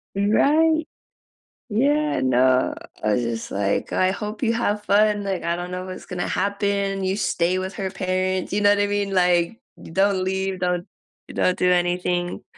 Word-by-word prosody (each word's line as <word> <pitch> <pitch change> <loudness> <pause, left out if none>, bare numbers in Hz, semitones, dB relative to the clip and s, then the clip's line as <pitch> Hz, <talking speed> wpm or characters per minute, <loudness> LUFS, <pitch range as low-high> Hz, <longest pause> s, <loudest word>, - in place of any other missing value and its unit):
Right. 305 +10 +3 0.8
Yeah, 290 +7 +1
no, 130 0 +3 0.3
I 105 0 +1
was 125 - 0
just 115 -1 -4
like, 100 0 -1
"Oh, - - -1
I 185 0 +3
hope 210 +1 -6
you 230 - +2
have 210 -3 -1
fun, 205 0 +3
like, 195 -3 -2
I 170 0 -1
don't 175 +1 -6
know 180 0 -4
what's 185 0 -8
gonna 180 -1 -3
happen. 200 0 -1
You 190 +1 0
stay 180 -3 0
with 190 +1 -4
her 190 -1 -3
parents." 185 -1 -2
You 205 - +1
know 205 - +4
what 205 - +3
I 205 - +2
mean? 205 -1 -1
Like, 180 +3 +2 0.2
"D - - -11
don't 195 +1 +2
leave, 190 0 -2
don't 180 -1 -1 0.5
don't 185 - +1
do 180 0 +3
anything." 175 0 -1
190 Hz, 180 wpm, -23 LUFS, 180-205 Hz, 0.8 s, know